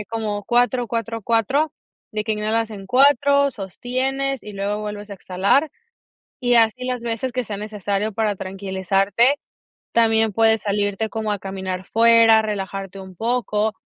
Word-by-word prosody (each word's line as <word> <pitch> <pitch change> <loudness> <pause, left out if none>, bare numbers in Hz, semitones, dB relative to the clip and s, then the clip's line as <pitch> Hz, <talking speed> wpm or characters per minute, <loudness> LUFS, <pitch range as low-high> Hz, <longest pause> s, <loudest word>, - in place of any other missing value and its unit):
eh, - - -5
como 215 -2 -3
4, 245 +1 +1
4, 230 0 -3
4, 250 +8 +1 0.4
de 215 0 -2
que 220 - 0
inhalas 215 +1 -1
en 195 -3 -9
4, 280 +3 +4
sostienes, 260 +6 -3
y 210 - -9
luego 200 +1 -2
vuelves 210 0 -6
a - - -5
exhalar, 195 - +1 0.7
y 245 -2 +2
así 230 +2 +3
las 250 -1 -3
veces 235 +2 -3
que 255 - -1
sea 210 -2 -5
necesario 210 0 -3
para 210 -2 0
tranquilizarte. 195 +6 +1 0.6
También 225 -1 +3
puedes 225 0 +3
salirte 205 +1 -1
como 220 -1 -2
a 205 - -2
caminar 190 -1 -5
fuera, 230 -1 +5
relajarte 195 -2 -4
un 190 -1 -11
poco, 220 -1 0
220 Hz, 150 wpm, -21 LUFS, 200-235 Hz, 0.7 s, fuera